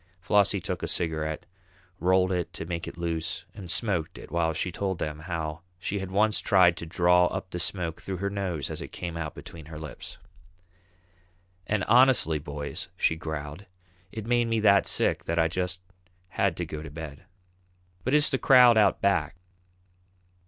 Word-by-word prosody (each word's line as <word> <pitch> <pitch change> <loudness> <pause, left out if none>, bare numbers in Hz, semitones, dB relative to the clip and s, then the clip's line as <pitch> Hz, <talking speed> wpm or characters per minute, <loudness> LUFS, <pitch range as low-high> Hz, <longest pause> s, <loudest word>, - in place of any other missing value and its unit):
Flossie 100 +2 +3
took - - -4
a - - -2
cigarette, 80 -2 -2 0.5
rolled 95 +2 +3
it 90 -2 -1
to - - -6
make 85 -1 -4
it - - -8
loose, 85 -1 -3
and 95 -4 -9
smoked 90 -6 -1
it - - -11
while 85 -1 +1
she 85 +3 -2
told 95 0 -2
them 75 -2 -4
how 80 -1 -4 0.2
she 100 +3 -3
had 95 -1 -5
once 105 +3 +2
tried 90 -5 +5
to 85 - -6
draw 90 +1 +4
up 95 0 -5
the 90 - -4
smoke 85 -2 -2
through 95 -1 -4
her 100 +2 -2
nose 90 -8 -3
as - - -5
it - - -5
came 85 -2 -5
out 80 -2 -4
between 80 -3 -10
her 80 -1 -8
lips. 75 -1 -8 1.5
"And 105 -3 0
honestly, 120 - +5
boys," 70 0 -5
she 80 - +2
growled, 80 +2 -6 0.4
"it 110 -2 -6
made 120 0 +2
me 115 -1 +1
that 100 -2 +5
sick - - +1
that 85 - -2
I 80 -1 +4
just 90 +1 -2 0.5
had 95 -1 0
to 85 - -2
go 75 -1 -6
to 80 - -8
bed." 75 +1 -9 0.8
"Who - - -1
is 150 +2 +3
the 130 - +1
crowd 125 -3 +7
out 100 -2 +3
back?" 90 -6 +1
90 Hz, 180 wpm, -27 LUFS, 80-100 Hz, 1.5 s, crowd